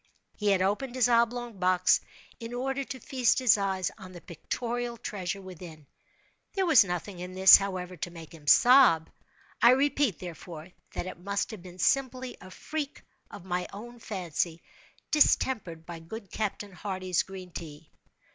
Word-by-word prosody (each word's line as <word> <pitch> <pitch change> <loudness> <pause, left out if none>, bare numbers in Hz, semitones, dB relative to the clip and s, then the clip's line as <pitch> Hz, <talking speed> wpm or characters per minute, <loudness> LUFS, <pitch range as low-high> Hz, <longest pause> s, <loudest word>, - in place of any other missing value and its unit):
He 210 - -3
had 190 -2 +3
opened 225 +7 -1
his 250 -2 +3
oblong 235 -2 +1
box, 185 0 +3 0.4
in 230 0 -6
order 270 +2 -2
to 260 0 -7
feast 250 0 +1
his 255 -4 +5
eyes 190 -3 -1
on 185 -2 -11
the 175 - -9
pictorial 235 +7 -4
treasure 195 -2 -5
within. 170 -5 -11 0.7
There 385 -1 +1
was 310 -10 +7
nothing 180 0 -5
in 180 +1 -7
this, 190 0 +9
however, 185 -2 -4
to 175 - -4
make 165 -2 -12
him 155 -3 -15
sob. 240 - +6 0.5
I 235 - +8
repeat, 275 - +1
therefore, 170 -1 -9 0.2
that - - -4
it 185 - -8
must 200 +4 -2
have 215 -5 -8
been 180 0 -12
simply 260 +3 0
a 185 - -11
freak 290 +9 -5 0.3
of 170 - -11
my 180 -1 -2
own 240 +4 -10
fancy, 175 -5 -3 0.5
distempered 215 - +2
by 170 -1 -8
good 200 +5 -9
Captain 205 -1 -3
Hardy's 185 -1 -2
green 185 -2 -9
tea. 155 -2 -9
195 Hz, 160 wpm, -28 LUFS, 180-240 Hz, 0.7 s, this